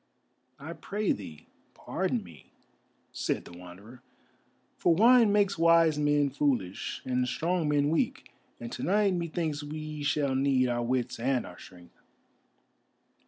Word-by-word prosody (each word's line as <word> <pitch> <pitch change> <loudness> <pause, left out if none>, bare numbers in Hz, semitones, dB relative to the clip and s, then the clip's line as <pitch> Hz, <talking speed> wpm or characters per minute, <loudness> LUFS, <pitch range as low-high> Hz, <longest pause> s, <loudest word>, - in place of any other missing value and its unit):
"I - - -8
pray 210 +1 -2
thee, 80 -7 -6 0.3
pardon - - -2
me," - - -15 0.6
said - - -3
the 85 - -12
Wanderer, 95 +8 -13 0.8
"for 170 - +3
wine 230 +2 +6
makes 200 -3 +2
wise 165 -2 +4
men 145 -1 +2
foolish 130 -10 -2
and 125 0 0
strong 165 +4 -1
men 145 0 +2
weak, 165 - -2 0.3
and 120 0 -7
to - - -6
night 200 +1 +2
methinks 165 -3 -2
we 155 0 -6
shall 145 -1 0
need 130 -1 +2
our 120 0 -1
wits 125 0 -2
and 125 +1 0
our 90 0 -12
strength." 90 -2 -16
145 Hz, 135 wpm, -28 LUFS, 125-165 Hz, 0.8 s, wine